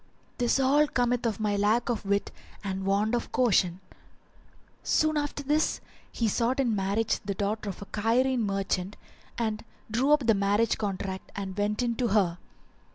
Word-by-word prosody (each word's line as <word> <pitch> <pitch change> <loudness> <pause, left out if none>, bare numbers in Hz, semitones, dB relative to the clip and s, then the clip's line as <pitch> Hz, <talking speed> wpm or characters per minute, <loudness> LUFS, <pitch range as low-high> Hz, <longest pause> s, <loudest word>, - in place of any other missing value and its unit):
This 245 +2 +2
all 285 +3 +4
cometh 245 -2 0
of 220 -2 -2
my 210 -1 0
lack 210 +4 +2
of 230 -5 -2
wit 200 0 0 0.3
and 190 -1 -3
want 205 +3 +1
of 240 - -1
caution." 195 -7 +2 1.0
Soon 310 0 +2
after 290 -1 -2
this 300 +3 +1 0.3
he 230 - 0
sought 235 +5 0
in 240 -5 +2
marriage 200 +3 0
the 200 -1 -3
daughter 205 +2 -2
of 195 - -7
a - - -10
Cairene 240 +6 +1
merchant, 195 -1 -2 0.4
[FN#382] 235 - 0
and 215 0 -4 0.3
drew 255 +6 +2
up 300 -4 +4
the 225 - +5
marriage 205 +3 +1
contract 195 -2 -4
and 195 -2 -5
went 210 +3 0
in 235 -1 0
to 245 - +1
her. 190 -5 +2
215 Hz, 170 wpm, -28 LUFS, 200-245 Hz, 1.0 s, the